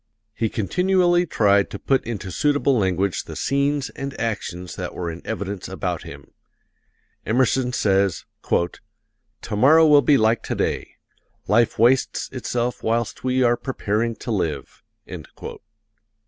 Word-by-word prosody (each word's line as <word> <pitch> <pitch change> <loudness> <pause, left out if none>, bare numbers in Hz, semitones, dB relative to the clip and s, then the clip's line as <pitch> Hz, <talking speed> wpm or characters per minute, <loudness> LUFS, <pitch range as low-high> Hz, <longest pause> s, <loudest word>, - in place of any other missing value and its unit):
He 115 - -1
continually 175 - +2
tried 100 -6 +3
to - - -6
put 135 +6 +1
into 105 -5 -5
suitable 145 - +2
language 95 -3 0
the - - -8
scenes 140 0 0
and 140 -1 -6
actions 90 -5 -4
that - - -6
were 85 -2 -3
in 85 - -9
evidence 100 -3 -4
about - - -3
him. - - -11 0.9
Emerson 125 +2 +1
says: 100 -5 +1 1.2
"Tomorrow 145 +10 +5
will 150 -2 +6
be 140 +2 +4
like 110 -1 +2
today. - - -3 0.5
Life 115 +2 +3
wastes 125 +4 +2
itself 125 -1 -3
whilst 115 0 -1
we 130 0 +1
are 120 0 +4
preparing 115 -3 -2
to 120 - -6
live." 80 -9 -3
115 Hz, 125 wpm, -22 LUFS, 100-135 Hz, 1.2 s, will